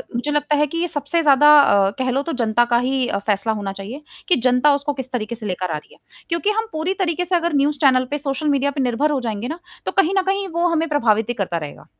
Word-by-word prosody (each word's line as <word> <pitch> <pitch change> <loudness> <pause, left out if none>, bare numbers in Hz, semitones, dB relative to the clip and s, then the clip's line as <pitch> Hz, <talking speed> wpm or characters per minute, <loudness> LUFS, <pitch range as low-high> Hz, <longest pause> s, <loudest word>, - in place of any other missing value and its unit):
मुझे 290 +5 -2
लगता 295 0 0
है 295 0 +2
कि 335 - -6
ये 350 +1 0
सबसे 300 +1 -2
ज़्यादा 295 -1 +5
अ, 200 -7 +4
कह 255 0 0
लो 270 +2 0
तो 330 - -4
जनता 230 +2 +2
का - - +5
ही 265 -1 0 0.2
फैसला 210 +1 0
होना 205 -2 -4
चाहिए 215 +10 -8 0.3
कि 360 - +5
जनता 250 +4 +4
उसको 285 +1 -3
किस 265 -2 -7
तरीके 235 -2 -3
से 220 -2 -10
लेकर 185 -2 -3
आ 155 - -1
रही 150 - -15
है - - -22 0.3
क्योंकि 335 +4 0
हम 450 - -3
पूरी 315 +4 -2
तरीके 355 -1 -1
से 355 +1 0
अगर 340 -2 0
न्यूज़ 290 +1 +1
चैनल 255 -2 +4
पे, 290 - 0
सोशल 280 +1 -3
मीडिया 280 -1 +1
पे 280 -1 -3
निर्भर 255 +5 0
हो 285 - 0
जाएँगे 225 -1 -4
ना, 325 +5 -6 0.3
तो - - -2
कहीं 390 -1 +2
न - - +4
कहीं 390 +1 -1
वो 340 0 0
हमें 330 -1 0
प्रभावित 225 -6 +1
ही - - 0
करता 195 -7 -3
रहेगा। 150 -3 -8
280 Hz, 265 wpm, -20 LUFS, 235-320 Hz, 0.3 s, ज़्यादा